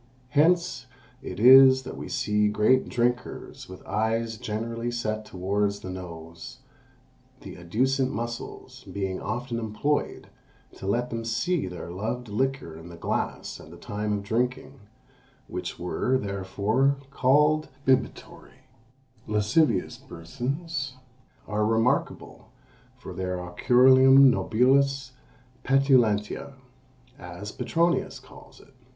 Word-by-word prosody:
"Hence 155 -2 +2 0.3
it - - -7
is 130 +2 +8
that 130 - -7
we - - -7
see 105 0 +1
great 105 +5 +2
drinkers 125 -4 -3
with 95 - -11
eyes 115 +1 -1
generally 115 +3 -4
set 110 -2 -3
towards 100 +2 -2
the 95 - -6
nose, 85 -2 -9 0.8
the - - -9
adducent 130 +10 0
muscles 120 +2 -6
being 95 -2 -4
often 120 -1 -3
employed 115 +7 -2 0.5
to 95 - -7
let 120 +5 -1
them 115 0 -3
see 145 - -1
their 90 -1 -7
loved 115 +6 -4
liquor 130 -6 -2
in 80 +2 -11
the 85 - -10
glass - - -3
at 75 - -13
the 85 - -12
time 105 +4 -4
of 100 -1 -3
drinking; 125 +5 -2 0.7
which - - -5
were, 125 +8 0
therefore, 105 +6 0
called 150 +4 +3 0.2
bibitory 130 -1 -2 0.6
Lascivious 105 +9 +1
persons 135 - -5 0.5
are 105 +1 -1
remarkable 115 +3 -1 0.5
for - - -9
the 90 0 -3
oculorum 130 +9 +5
nobilis 135 +3 +2 0.5
petulantia, 130 -4 +2 0.7
as 90 +4 -8
Petronius 170 +7 0
calls - - -16
it. - - -20
115 Hz, 110 wpm, -26 LUFS, 100-130 Hz, 0.8 s, is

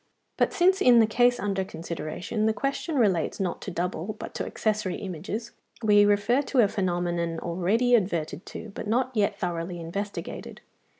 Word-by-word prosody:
But - - +2
since 375 +2 +3
in 245 -7 +7
the 225 - +6
case 245 +3 +3
under 195 -1 -1
consideration 170 +3 -6
(227) 215 - +3
the 220 - 0
question 280 +3 -2
relates 195 - +1
not 185 -3 -2
to - - -5
double 180 +3 -3
but - - -7
to - - -3
accessory 210 -4 -1
images, 200 +5 -5 0.3
we 205 -1 +6
refer 205 +6 +3
to 275 -3 +2
a 210 - +5
phenomenon 175 -4 -1
already 185 +9 +1
adverted 170 -7 +1
to, 215 - -8
but - - -6
not 250 +4 +1
yet 205 -2 +1
thoroughly 175 -1 -3
investigated. 200 +5 -6
200 Hz, 170 wpm, -27 LUFS, 175-225 Hz, 0.3 s, in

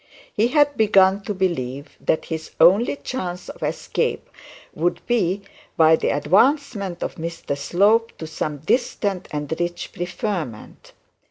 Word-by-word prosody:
He 220 +3 +2
had 290 +1 +3
begun 195 -3 +4
to 210 - -2
believe 140 -8 -2
that 160 - 0
his 160 -1 -5
only 195 +11 +5
chance 180 -11 -5
of - - -10
escape - - -2 0.5
would 170 +3 0
be 200 -5 0 0.3
by 160 0 +6
the - - -1
advancement 200 - +1
of - - -5
Mr 165 -3 -4
Slope 205 +10 +2
to 160 - -6
some 155 -1 -4
distant 200 -1 -1
and 150 +1 -3
rich 175 0 -3
preferment. 175 - -5
180 Hz, 135 wpm, -22 LUFS, 160-210 Hz, 0.5 s, by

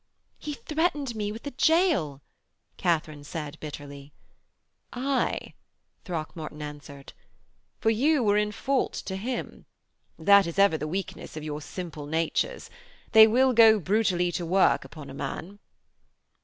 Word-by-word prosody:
'He 300 - -5
threatened 295 -4 -1
me 210 -1 -2
with 225 +5 -9
a 285 - -4
gaol,' 275 - +2 0.5
Katharine 155 -4 -1
said 150 0 -6
bitterly. 145 -1 -9 0.8
'Aye,' 265 +2 -1 0.5
Throckmorton 155 -3 -6
answered, 145 -2 -9 0.7
'for 225 - +2
you 275 +5 +2
were 205 -2 +3
in 210 0 +1
fault 260 +5 -1
to 190 - -5
him. 240 +6 -5 0.5
That 200 +3 +5
is 170 - -6
ever 195 -4 +5
the 150 - -3
weakness 180 -2 -5
of 155 - -6
your 150 0 -5
simple 155 -2 -7
natures. 165 - -1 0.4
They 220 -1 +9
will 255 +3 +3
go 220 -2 +7
brutally 185 -2 +1
to 175 - -3
work 185 +3 +3
upon 145 -4 -10
a - - -9
man.' 190 +7 -6
190 Hz, 135 wpm, -27 LUFS, 155-230 Hz, 0.8 s, They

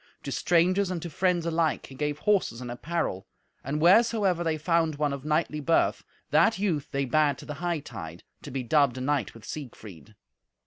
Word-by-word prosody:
To - - -5
strangers 180 +3 +2
and 180 -2 -2
to 170 - -6
friends 180 +1 +1
alike 165 -1 0
he - - -13
gave 150 +2 -2
horses 195 - +1
and 125 -1 -6
apparel, 135 - -3 0.4
and 145 +3 -2
wheresoever 195 0 +4
they 160 -2 0
found 165 0 +1
one 145 -1 0
of 140 -1 -6
knightly 155 0 0
birth, 165 +3 +1 0.3
that 225 - +4
youth 180 -8 -1
they 140 0 -1
bade 145 +1 +2
to - - -11
the 150 - -6
hightide, 140 - -4 0.2
to - - -9
be 135 -1 -3
dubbed 140 0 +2
a - - -4
knight 130 -7 -1
with 115 - -13
Siegfried. 110 - -9
150 Hz, 185 wpm, -27 LUFS, 135-170 Hz, 0.4 s, wheresoever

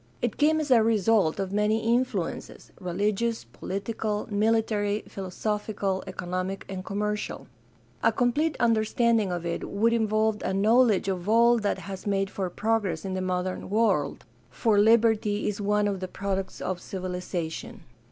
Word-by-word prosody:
It 240 -3 -2
came 310 +1 +3
as 300 -3 -2
a 235 -3 +7
result 220 -5 +2
of 190 -1 -2
many 215 +3 +1
influences 240 -8 -2
— - - -21
religious, 210 +5 0
political, 210 +2 -4
military, 210 -1 +1
philosophical, 200 0 -3
economic, 185 +2 -4
and 190 -1 -5
commercial. 210 +2 -3 0.6
A - - +4
com 245 -2 +1
plete 310 +3 0
understanding 230 -2 +2
of 175 -1 -3
it 170 - -3
would 225 +3 +2
involve 220 -1 +1
a 190 - -1
knowledge 220 0 +4
of 190 0 -2
all 235 +1 +5
that 205 -1 0
has 195 0 -7
made 195 -1 0
for 190 -2 -3
progress 205 -4 -1
in 190 - -3
the 185 - -2
modern 185 0 -2
world, 200 -10 +1 0.2
for 205 - +2
liberty 220 -1 +3
is 210 0 -2
one 210 +1 +2
of 200 -2 -2
the 185 - -4
products 195 0 -4
of 180 -1 -3
civilization. 180 -3 -5
205 Hz, 150 wpm, -27 LUFS, 190-225 Hz, 0.6 s, a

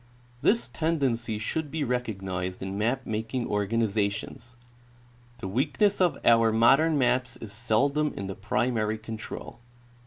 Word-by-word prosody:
This 120 0 +2
tendency 125 -5 -1
should 150 +8 -3
be 155 +1 -2
recognized 95 -8 -3
in 95 0 -4
map 120 +6 0
making 115 +3 -2
organizations. 105 +2 -1 0.8
The 95 - -6
weakness 145 - +1
of 180 -2 +3
our 115 -1 +5
modern 135 +8 +4
maps 125 -1 +1
is 110 -4 -9
seldom 140 +7 +1
in 100 - -4
the 95 - -4
primary 110 +1 0
control. 110 +1 -8
115 Hz, 125 wpm, -27 LUFS, 105-135 Hz, 0.8 s, our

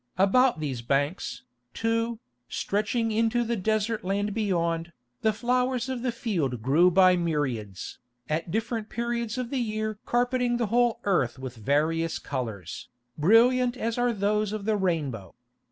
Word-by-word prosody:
About 235 +3 +4
these 135 -6 -3
banks, 140 +8 -1 0.3
too, 230 0 0 0.3
stretching 220 +3 -1
into 225 +2 +2
the 235 0 -1
desert 215 +2 0
land 200 +2 -1
beyond, 170 -5 -1 0.3
the 220 - +3
flowers 250 +3 0
of 255 -2 -3
the 250 0 0
field 165 - -2
grew 155 +8 +5
by 185 0 +5
myriads, 135 - -2 0.3
at 160 +3 -2
different 225 +2 -2
periods 235 -1 -2
of 250 -2 -3
the 270 - 0
year 215 -1 -2
carpeting 245 0 +1
the 240 - 0
whole 240 -1 +3
earth 135 -12 +1
with 130 -1 -7
various 155 +8 0
colours, 110 - -5 0.3
brilliant 240 - +4
as 230 -1 -1
are 245 0 +2
those 210 0 0
of 215 -2 -4
the 220 -1 +2
rainbow. 150 - -2
210 Hz, 145 wpm, -27 LUFS, 160-235 Hz, 0.3 s, grew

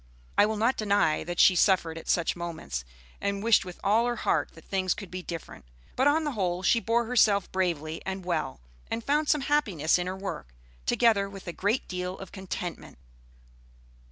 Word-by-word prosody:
I 205 - +5
will 220 0 -2
not 230 +5 +2
deny 200 -7 +2
that 175 +1 -4
she 185 - +7
suffered 175 -3 +3
at 165 - -9
such 170 -2 +2
moments, 160 - -5 0.4
and 200 0 -1
wished 230 -1 +5
with 180 -1 -9
all 220 +4 +3
her 240 - 0
heart 160 -8 0
that 165 - -15
things 190 -2 0
could 200 - -9
be 185 0 -5
different. 170 -2 -8 0.3
But 265 - +3
on 310 +2 +3
the 295 - -1
whole 185 -6 -1
she 230 - +4
bore 230 +1 +1
herself 215 -5 +3
bravely 165 -4 -1
and 190 -1 -5
well, 175 - -2 0.3
and 225 0 -3
found 295 +3 +1
some 300 - +3
happiness 200 - +2
in 180 - -2
her 185 +1 -4
work, 130 - -6 0.3
together 210 -4 +3
with 195 -1 -11
a 175 - -4
great 205 +8 0
deal 180 0 -4
of 195 - -10
contentment. 180 -2 -6
190 Hz, 190 wpm, -28 LUFS, 175-225 Hz, 0.4 s, she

